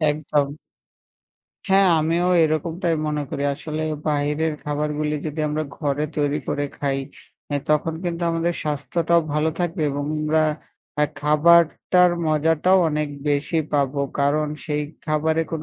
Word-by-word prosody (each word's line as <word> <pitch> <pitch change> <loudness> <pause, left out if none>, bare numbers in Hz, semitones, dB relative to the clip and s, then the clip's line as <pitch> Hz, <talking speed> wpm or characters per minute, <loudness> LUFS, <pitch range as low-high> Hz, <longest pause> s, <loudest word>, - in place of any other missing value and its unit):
একদম। 150 -1 0 1.1
হ্যাঁ, 195 0 +5
আমিও 165 +3 +1 0.2
এরকমটাই 165 +2 -1
মনে 150 -1 -1
করি। 140 - -3
আসলে 155 +2 -5 0.3
বাহিরের 150 +2 0
খাবারগুলি 150 +1 -1
যদি 155 +1 -4
আমরা 155 +1 -1
ঘরে 145 -1 -1
তৈরি 145 0 +1
করে 145 - -1
খাই। 140 -1 0 0.6
এ - - +3
তখন 155 +1 +1
কিন্তু 170 0 -3
আমাদের 165 +1 0
স্বাস্থ্যটাও 165 +3 +1
ভালো 150 +2 +1
থাকবে 175 -1 -1
এবং 145 +1 -3
আমরা 155 +1 +2 0.6
এ - - +6 0.2
খাবারটার 170 +4 +4 0.2
মজাটাও 160 +4 +3
অনেক 150 -1 -1 0.2
বেশি 145 +3 +1
পাবো 140 -1 +1 0.2
কারণ 150 +2 +2 0.2
সেই 150 -1 -1 0.2
খাবারে 160 +1 +1
কোন 160 -1 -3
155 Hz, 130 wpm, -22 LUFS, 150-165 Hz, 1.1 s, এ